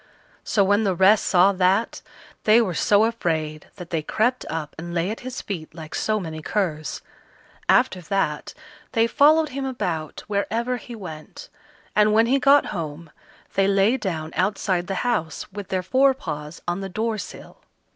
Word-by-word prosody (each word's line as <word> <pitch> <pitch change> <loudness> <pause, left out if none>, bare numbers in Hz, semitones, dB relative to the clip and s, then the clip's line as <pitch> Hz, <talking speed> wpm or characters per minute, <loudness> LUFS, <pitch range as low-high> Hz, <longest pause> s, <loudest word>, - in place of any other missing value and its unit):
So 205 - +2
when 205 +3 +3
the 195 -3 +1
rest 195 +4 +5
saw 185 +2 +5
that, 190 +3 +1 0.4
they 220 +2 +6
were 205 -7 0
so 205 +4 +3
afraid 160 -9 -2
that 180 -3 -10
they 165 -2 0
crept 240 +10 0
up 155 -2 -4
and 170 +1 -6
lay 175 +4 0
at 225 - -5
his 255 +1 -6
feet 165 -5 -6
like 160 -2 -9
so 215 0 0
many 160 -4 -6
curs. 155 -4 -2 0.7
After 245 -7 +3
that 165 -4 -2 0.4
they 225 -2 +4
followed 305 +6 +4
him 275 0 -4
about 175 - -3
wherever 225 +4 -1
he 240 0 -9
went, 180 - -9 0.5
and 210 0 +4
when 225 +1 +5
he 265 +4 +2
got 280 +2 +5
home, 160 -2 -6 0.4
they 195 0 +2
lay 200 +4 +3
down 165 -9 -4
outside 185 -2 0
the 195 - -2
house, 210 -10 -1
with 200 -1 -7
their 185 -1 -2
fore 265 +7 +3
paws 150 - -7
on 175 +2 -1
the 195 - -5
door 220 +3 -2
sill. - - -9
195 Hz, 170 wpm, -23 LUFS, 165-225 Hz, 0.7 s, they